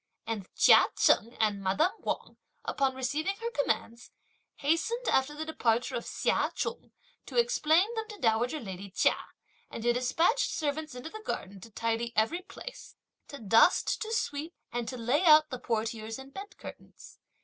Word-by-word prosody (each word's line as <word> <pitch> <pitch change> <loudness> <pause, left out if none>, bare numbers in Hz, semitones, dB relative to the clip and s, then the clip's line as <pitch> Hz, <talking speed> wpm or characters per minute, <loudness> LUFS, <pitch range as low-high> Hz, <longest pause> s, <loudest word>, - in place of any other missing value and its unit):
And 215 -5 -4
Chia - - +7
Cheng 230 +3 +3
and 210 -2 +1
madame 195 - +2
Wang, - - -4 0.3
upon 270 -2 0
receiving 295 +9 -1
her 465 +2 -4
commands, 245 - -2 0.5
hastened, 335 - 0
after 265 +3 +2
the 315 +1 -4
departure 245 -5 0
of 235 - -3
Hsia - - 0
Chung, - - -4 0.4
to - - -6
explain 415 -4 +3
them 445 -1 -3
to 420 - -8
dowager 240 - +1
lady 195 -3 -7
Chia, 185 - +2 0.5
and 225 - -7
to 240 0 +3
despatch 330 - +2
servants 305 -2 -3
into 250 +6 -7
the 435 - -8
garden 195 - -5
to 230 - -11
tidy 230 +2 -2
every 225 +12 +1
place, - - -10 0.3
to 285 - -8
dust, 225 - +3
to 445 - -3
sweep, 315 -6 -2 0.2
and 240 -1 -3
to 255 - -5
lay 245 +8 +1
out 310 -2 +7
the 255 - -4
portieres 225 -1 -3
and 270 +1 -12
bed 400 +1 -9
curtains. - - -12
265 Hz, 165 wpm, -30 LUFS, 230-325 Hz, 0.5 s, Chia